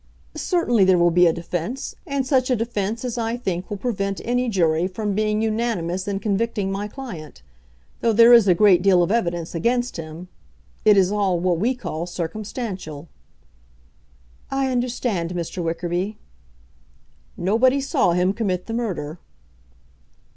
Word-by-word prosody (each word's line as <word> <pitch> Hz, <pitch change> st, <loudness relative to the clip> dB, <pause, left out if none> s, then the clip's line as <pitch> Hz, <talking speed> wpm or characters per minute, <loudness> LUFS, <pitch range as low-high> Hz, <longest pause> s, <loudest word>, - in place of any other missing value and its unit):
"Certainly 245 Hz, -, +2 dB
there 185 Hz, -1 st, +5 dB
will 175 Hz, 0 st, +4 dB
be 175 Hz, +1 st, +5 dB
a -, -, +4 dB
defence, 175 Hz, +9 st, -4 dB
and 280 Hz, -2 st, -1 dB
such 260 Hz, -1 st, +2 dB
a 255 Hz, -, +3 dB
defence 225 Hz, 0 st, -2 dB
as 245 Hz, -1 st, -3 dB
I 230 Hz, +1 st, -1 dB
think 185 Hz, -6 st, -3 dB
will 205 Hz, -, -4 dB
prevent 200 Hz, -3 st, -2 dB
any 245 Hz, +1 st, 0 dB
jury 170 Hz, -4 st, +2 dB
from 205 Hz, +2 st, -3 dB
being 215 Hz, +1 st, 0 dB
unanimous 215 Hz, -5 st, -1 dB
in 200 Hz, -1 st, -1 dB
convicting 205 Hz, -1 st, -1 dB
my 200 Hz, +1 st, -3 dB
client. 205 Hz, -, -9 dB, 0.6 s
Though 230 Hz, -, +2 dB
there 230 Hz, +2 st, +7 dB
is 230 Hz, -4 st, +7 dB
a 180 Hz, -, +5 dB
great 190 Hz, -3 st, +5 dB
deal 185 Hz, -2 st, +4 dB
of 175 Hz, -, -1 dB
evidence 175 Hz, -7 st, -1 dB
against 240 Hz, +8 st, 0 dB
him, 165 Hz, +2 st, -8 dB, 0.6 s
it 210 Hz, -1 st, +6 dB
is 190 Hz, 0 st, +4 dB
all 195 Hz, -4 st, +1 dB
what 175 Hz, -1 st, +1 dB
we 245 Hz, +7 st, +1 dB
call 170 Hz, -8 st, -5 dB
circumstantial." 180 Hz, -, -5 dB, 1.4 s
"I 270 Hz, -1 st, 0 dB
understand, 240 Hz, -8 st, -1 dB
Mr. 175 Hz, +1 st, -4 dB
Wickerby." 175 Hz, +5 st, -2 dB, 1.2 s
"Nobody 230 Hz, +9 st, +3 dB
saw 270 Hz, -10 st, +1 dB
him 180 Hz, +2 st, +2 dB
commit 190 Hz, -5 st, -2 dB
the 225 Hz, -, -5 dB
murder." 180 Hz, -9 st, -3 dB
200 Hz, 150 wpm, -22 LUFS, 175-235 Hz, 1.4 s, there